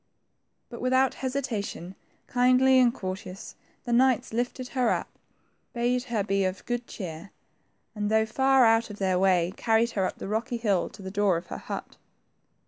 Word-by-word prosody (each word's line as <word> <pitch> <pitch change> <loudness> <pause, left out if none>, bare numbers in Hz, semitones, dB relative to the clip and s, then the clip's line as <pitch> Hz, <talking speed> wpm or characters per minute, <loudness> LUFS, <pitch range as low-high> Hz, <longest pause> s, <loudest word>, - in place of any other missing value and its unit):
But 235 - -9
without 260 +1 +2
hesitation, 245 -9 -3 0.3
kindly 255 +1 +4
and 245 -2 +5
courteously, 185 -3 -7 0.3
the 240 - -2
knights 255 -2 +3
lifted 245 +2 -3
her 255 -3 +1
up, - - -1 0.6
bade 245 +1 0
her 230 -5 -1
be 195 0 0
of 185 0 -3
good 240 0 -3
cheer, 175 -1 -7 0.6
and 210 -1 -2
though 220 0 +3
far 265 +3 +3
out 225 0 +3
of 210 - -8
their 185 -2 +1
way, 185 -2 +2
carried 230 +1 +2
her 190 -4 0
up - - -7
the - - -6
rocky 230 +4 -2
hill 205 -6 0
to 195 - -13
the 190 - -6
door 200 -3 +2
of 170 - -7
her - - -5
hut. - - -7
225 Hz, 170 wpm, -27 LUFS, 195-250 Hz, 0.6 s, and